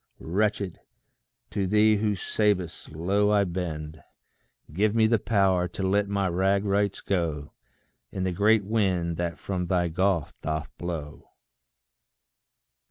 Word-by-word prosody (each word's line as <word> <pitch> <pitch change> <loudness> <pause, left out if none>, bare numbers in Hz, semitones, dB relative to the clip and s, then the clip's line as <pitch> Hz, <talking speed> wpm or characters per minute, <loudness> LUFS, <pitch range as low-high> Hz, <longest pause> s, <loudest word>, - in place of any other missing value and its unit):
Wretched, 100 +1 -1 0.7
to 100 -2 -1
thee 105 +2 +4
who 105 0 0
savest, 95 -5 -1
low 100 +6 +1
I 105 -1 +4
bend: 80 -4 -5 0.7
Give 105 +5 +1
me 110 -1 +4
the 110 0 +3
power 95 -5 +2
to 95 +2 -6
let 100 +2 +2
my 100 -1 0
rag 95 +3 +1
rights 100 0 0
go 80 -6 -2 0.6
In 95 - -3
the 95 - 0
great 105 +3 +3
wind 95 -6 0
that 85 -1 -2
from 90 -2 -3
thy 90 -1 +1
gulf 90 -1 0
doth 75 -1 -4
blow. 80 -4 -6
95 Hz, 130 wpm, -26 LUFS, 85-105 Hz, 0.7 s, thee